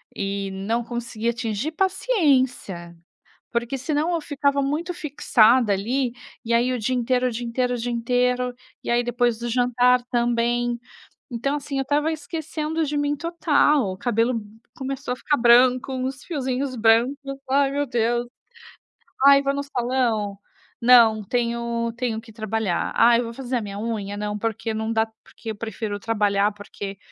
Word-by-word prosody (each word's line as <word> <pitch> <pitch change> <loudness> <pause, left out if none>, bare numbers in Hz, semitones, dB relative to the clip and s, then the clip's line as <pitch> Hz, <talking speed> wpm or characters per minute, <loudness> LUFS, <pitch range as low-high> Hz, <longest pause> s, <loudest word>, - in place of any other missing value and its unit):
e 195 0 -3
não 220 +5 -2
consegui 235 -1 -3
atingir, 235 +4 -2
paciência". 265 - 0 0.6
Porque 240 +3 -2
senão 310 +5 0
eu 330 - 0
ficava 280 -1 0
muito 305 +6 -1
fixada 250 - +3
ali 235 +6 0 0.3
e 235 - -2
aí 240 +2 +3
o 250 - -1
dia 240 +4 -1
inteiro, 250 +1 +1
o - - -3
dia 240 +1 -4
inteiro, 250 +1 0
o - - -1
dia 240 +1 -3
inteiro. 250 +1 0 0.3
E - - -4
aí 240 0 +3
depois 240 -1 +1
do 240 0 -4
jantar 250 +1 +3
também. 240 0 +1 0.5
Então, 275 +5 -1
assim, 280 -1 -4
eu - - +1
estava 295 +4 +1
esquecendo 315 +1 -3
de 295 0 -2
mim 290 0 0
total. 295 - +2
O - - -7
cabelo 230 +1 +1 0.4
começou 270 -1 -4
a - - -3
ficar 290 +3 0
branco, 250 +2 +5
uns 260 +1 -3
fiozinhos 265 -4 -2
brancos. 230 +5 +4 0.3
"Ai 275 0 +3
meu 285 0 0
Deus. 240 0 0 1.0
Ai, 280 0 +8
vou 275 0 0
no 280 - -2
salão? 240 -6 -1 0.4
Não 235 -3 +6
tenho 235 0 -1
tenho 235 -3 -2
que 225 -1 -15
trabalhar. 215 -4 -2
Ai 235 +1 +6
eu - - -3
vou 230 0 -7
fazer 255 -1 -3
a - - +1
minha 200 -1 -6
unha? 205 -2 -3
Não 210 0 -3
porque 225 +1 -2
não 220 +1 -2
dá 220 0 +2 0.2
porque 225 - -9
eu 220 - -4
prefiro 220 -1 -4
trabalhar, 205 -2 +1
porque, 200 -1 -8
240 Hz, 165 wpm, -23 LUFS, 225-270 Hz, 1.0 s, Ai